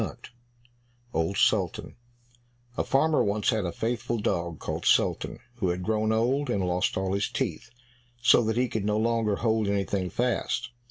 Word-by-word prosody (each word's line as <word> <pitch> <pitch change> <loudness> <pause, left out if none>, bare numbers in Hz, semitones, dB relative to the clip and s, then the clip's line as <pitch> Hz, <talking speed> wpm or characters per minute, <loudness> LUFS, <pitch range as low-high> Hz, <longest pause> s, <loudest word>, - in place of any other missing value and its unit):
48 - - -6 0.8
Old 80 +5 0
Sultan - - +1 0.8
A - - 0
farmer 155 +3 +2
once 105 +1 +1
had 110 -3 -1
a 85 - -2
faithful 115 +4 -2
dog 85 -6 -1
called - - -4
Sultan, - - +2 0.2
who 95 -6 0
had 90 +1 -2
grown 110 +1 +1
old, 125 +5 +1
and 100 -6 0
lost 90 0 0
all 95 0 -1
his 100 0 0
teeth, 115 - -3 0.5
so 120 0 +5
that 110 +1 0
he 125 +1 +2
could 110 -3 -3
no 105 +1 +1
longer 115 -2 +1
hold 110 -2 +1
anything 100 -2 -1
fast. 120 0 -1
110 Hz, 165 wpm, -27 LUFS, 95-115 Hz, 0.8 s, so